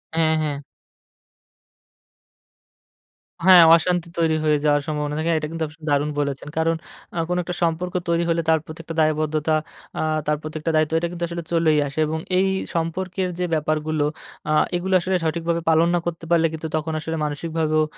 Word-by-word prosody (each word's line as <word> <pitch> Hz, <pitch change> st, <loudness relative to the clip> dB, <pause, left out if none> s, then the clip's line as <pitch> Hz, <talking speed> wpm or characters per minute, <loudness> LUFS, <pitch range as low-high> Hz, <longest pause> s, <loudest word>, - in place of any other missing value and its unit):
হ্যা, 160 Hz, -1 st, +3 dB
হ্যা। 145 Hz, -2 st, -2 dB, 2.9 s
হ্যা, 190 Hz, -, +9 dB, 0.2 s
অশান্তি 175 Hz, +1 st, 0 dB
তৈরি 165 Hz, -1 st, +2 dB
হয়ে 150 Hz, -1 st, +3 dB
যাওয়ার 145 Hz, -1 st, +3 dB
সম্ভাবনা 150 Hz, -1 st, -2 dB
থাকে 160 Hz, +1 st, -1 dB
এটা 155 Hz, -, -4 dB
কিন্তু 165 Hz, -1 st, -3 dB
আপনি 150 Hz, +2 st, -16 dB
দারুণ 145 Hz, +1 st, +2 dB
বলেছেন। 140 Hz, -1 st, -2 dB
কারণ 165 Hz, +1 st, +2 dB, 0.4 s
আ -, -, -4 dB
কোনো 180 Hz, 0 st, +1 dB
একটা 180 Hz, +1 st, -4 dB
সম্পর্ক 170 Hz, +2 st, -1 dB, 0.2 s
তৈরি 170 Hz, 0 st, +2 dB
হলে 165 Hz, 0 st, +2 dB
তার 160 Hz, 0 st, +4 dB
প্রত্যেকটা 165 Hz, +1 st, -8 dB
দায়বদ্ধতা 155 Hz, 0 st, +1 dB, 0.4 s
আ -, -, 0 dB, 0.3 s
তার 150 Hz, 0 st, +2 dB
প্রত্যেকটা 155 Hz, +1 st, -3 dB
দায়িত্ব 155 Hz, 0 st, +2 dB
এটা 170 Hz, -, -1 dB
কিন্তু 175 Hz, -1 st, -5 dB
আসলে 170 Hz, 0 st, -5 dB
চলেই 165 Hz, -2 st, +3 dB
আসে 140 Hz, +3 st, -5 dB
এবং 160 Hz, +1 st, -2 dB, 0.2 s
এই 190 Hz, -, +3 dB, 0.3 s
সম্পর্কের 180 Hz, +3 st, -2 dB
যে, 180 Hz, -, +1 dB
ব্যাপারগুলো 155 Hz, 0 st, 0 dB, 0.4 s
আ -, -, +2 dB, 0.2 s
এগুলো 185 Hz, +2 st, -1 dB
আসলে 185 Hz, +2 st, 0 dB
সঠিকভাবে 170 Hz, +1 st, -1 dB
পালন 160 Hz, +1 st, +4 dB
না -, -, +2 dB
করতে 165 Hz, -1 st, -4 dB
পারলে 165 Hz, -1 st, +4 dB
কিন্তু 160 Hz, 0 st, -4 dB
তখন 155 Hz, +1 st, -2 dB
আসলে 160 Hz, +1 st, -4 dB
মানসিকভাবেও 155 Hz, +1 st, 0 dB
160 Hz, 165 wpm, -22 LUFS, 155-170 Hz, 2.9 s, হ্যা